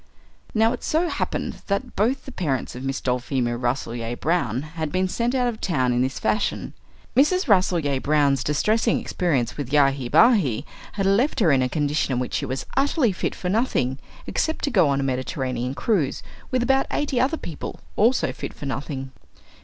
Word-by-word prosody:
Now 225 +2 +4
it 250 - -7
so 335 +3 +1
happened - - -3
that 200 -1 -2
both 245 +7 +1
the 270 - -8
parents 145 - -2
of 125 - -7
Miss 135 0 -2
Dulphemia 125 -1 -1
Rasselyer 120 -1 -2
Brown 150 - 0
had 155 0 -5
been 185 +2 +1
sent 235 +6 -1
out 250 -1 +2
of 235 -2 -4
town 130 -9 +1
in 120 - +1
this 130 +1 -1
fashion. 215 - -1 0.4
Mrs. 310 +7 +3
Rasselyer 175 - +2
Brown's 145 -2 +2
distressing 215 - +2
experience 130 -9 -1
with 140 -3 -4
Yahi 135 -3 +3
Bahi 155 - +4 0.3
had 195 -2 -1
left 225 +10 +2
her 180 -8 +4
in 135 -2 +4
a 125 - +1
condition 145 -1 0
in 125 - 0
which 125 - -3
she - - -1
was 130 +1 -3
utterly 275 -3 +2
fit 185 - -3
for 180 - -4
nothing, 180 - 0 0.3
except 315 - -1
to 285 - 0
go 180 - +4
on 140 0 +1
a - - 0
Mediterranean 130 -1 -2
cruise, 170 - 0 0.3
with 255 -2 +1
about 270 +2 +2
eighty 285 -4 0
other 280 +5 +1
people 165 - -7 0.2
also 235 +5 +3
fit - - -7
for - - -8
nothing. 135 -1 -4
155 Hz, 185 wpm, -24 LUFS, -, 0.4 s, Now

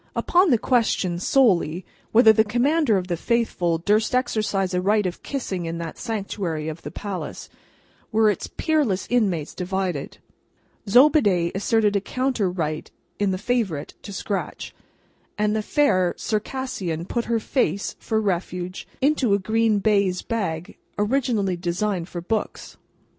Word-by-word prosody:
Upon 360 +1 +3
the 245 - +5
question, 215 -8 +1
solely, 185 - +2 0.3
whether 220 -1 +7
the 220 - +4
Commander 245 +2 +2
of 185 - -2
the 180 -1 -2
Faithful 180 -5 0
durst 210 +8 +1
exercise 215 -6 0
a 180 - +1
right 205 +2 +2
of 175 -1 -4
kissing 190 - -4
in 165 +1 -3
that 165 -2 -6
sanctuary 195 -7 -3
of 160 +1 -7
the - - -6
palace, 200 -3 -6 0.6
were 220 0 +4
its 205 -4 0
peerless 295 - 0
inmates 190 -11 +1
divided. 180 -5 -3 0.7
Zobeide 210 - +5
asserted 210 +1 +1
a 200 - +2
counter 255 -3 -1
right 155 -4 -3 0.3
in 205 -1 +2
the 185 - 0
Favourite 205 - -1
to - - -9
scratch, 195 +1 -4 0.6
and 210 0 +1
the 220 - +1
fair 185 -8 +2
Circassian 210 -7 -3
put 235 +5 -2
her 230 -1 +1
face, 215 -3 -1
for 220 -1 -1
refuge, 180 -2 -3
into 265 -7 +3
a - - +2
green 220 +2 +1
baize 200 -3 +1
bag, 190 -5 -3 0.2
originally 210 -4 +1
designed 175 +1 -2
for 175 - -5
books. 215 +5 -3
205 Hz, 140 wpm, -23 LUFS, 180-230 Hz, 0.7 s, whether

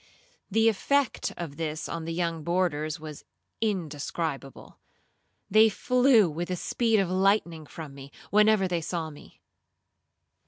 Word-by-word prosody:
The 225 +2 +3
effect 270 +5 +1
of 155 -5 -6
this 155 -1 -3
on 165 -1 -5
the 165 - -4
young 165 -2 -2
boarders 160 -2 -1
was 155 -2 -9 0.4
indescribable. 160 -7 -4 0.7
They 220 +2 +6
flew 245 -1 +4
with 170 +2 -4
the 185 - -2
speed 225 +4 +1
of 195 - +1
lightning 185 -5 +1
from 155 -3 -9
me, 135 0 -11 0.2
whenever 210 -1 +4
they 175 -2 -1
saw 160 -1 -3
me. 145 - -16
175 Hz, 130 wpm, -27 LUFS, 155-210 Hz, 0.7 s, They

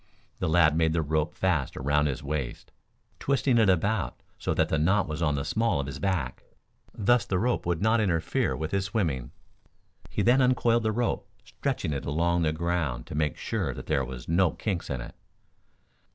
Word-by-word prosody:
The - - 0
lad 80 -2 +4
made 80 -1 +2
the 80 -1 +1
rope 75 +1 -1
fast 85 -8 0
around 75 +2 +2
his 70 -1 -3
waist, 70 -4 -4 0.5
twisting 135 -3 +2
it 110 -3 +4
about 95 +3 0 0.2
so - - -1
that - - +2
the 80 - +1
knot 95 +6 +2
was 75 +1 -4
on 75 -3 +2
the 70 - -2
small 110 -8 +1
of 70 - -1
his 70 - -6
back. 90 -11 -1 0.5
Thus 115 +2 +2
the 95 - -1
rope 120 -1 0
would 85 +1 0
not 110 +1 +3
interfere 85 -6 0
with 80 0 -3
his 100 -1 0
swimming. 80 - -1 0.8
He - - -1
then 125 +3 +5
uncoiled 120 -2 +3
the 110 -1 0
rope, 120 +2 -1 0.2
stretching 75 - -2
it 70 - -4
along 85 +4 +1
the 80 -2 +2
ground 80 -7 -1
to - - -9
make 75 0 0
sure - - -2
that - - -8
there 70 - +1
were 65 0 -6
no 85 +2 +3
kinks 95 -6 -3
in 65 -3 -3
it. - - -8
85 Hz, 195 wpm, -27 LUFS, 75-100 Hz, 0.8 s, then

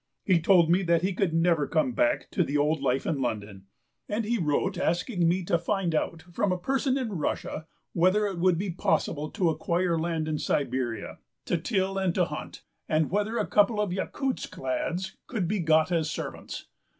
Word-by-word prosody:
He 185 -4 +3
told 170 0 +5
me 180 +3 +4
that 170 -2 +2
he 190 +1 +1
could 180 -1 0
never 165 -2 +2
come 160 +10 +1
back 300 +3 0
to 180 - +2
the 145 -1 -1
old 150 +1 +1
life 135 -1 0
in 145 -4 -1
London. 105 -5 -4 0.4
And 210 +2 -1
he 235 +1 0
wrote 170 +4 0
asking 175 +1 +1
me 180 +2 +1
to 170 0 +1
find 180 0 -1
out 160 +1 -1
from 195 +2 +1
a 180 - +1
person 265 +6 0
in 220 -10 -3
Russia 155 +1 -3 0.3
whether 185 +5 +3
it 195 -4 -3
would 180 -1 +3
be 190 +1 -2
possible 155 -3 0
to 180 -7 +1
acquire 170 +2 0
land 160 -1 -1
in 155 -1 -1
Siberia 125 -4 -2 0.3
to - - 0
till 190 +2 0
and 185 -3 0
to - - +3
hunt, - - -7 0.3
and 155 0 +1
whether 210 +4 0
a - - +1
couple 210 +1 +3
of 205 -4 0
Yakutsk 260 +7 -3
lads 190 - -2
could 205 -8 -2
be 205 +3 0
got 160 0 +3
as 160 -3 +1
servants. - - -6
175 Hz, 195 wpm, -27 LUFS, 160-195 Hz, 0.4 s, told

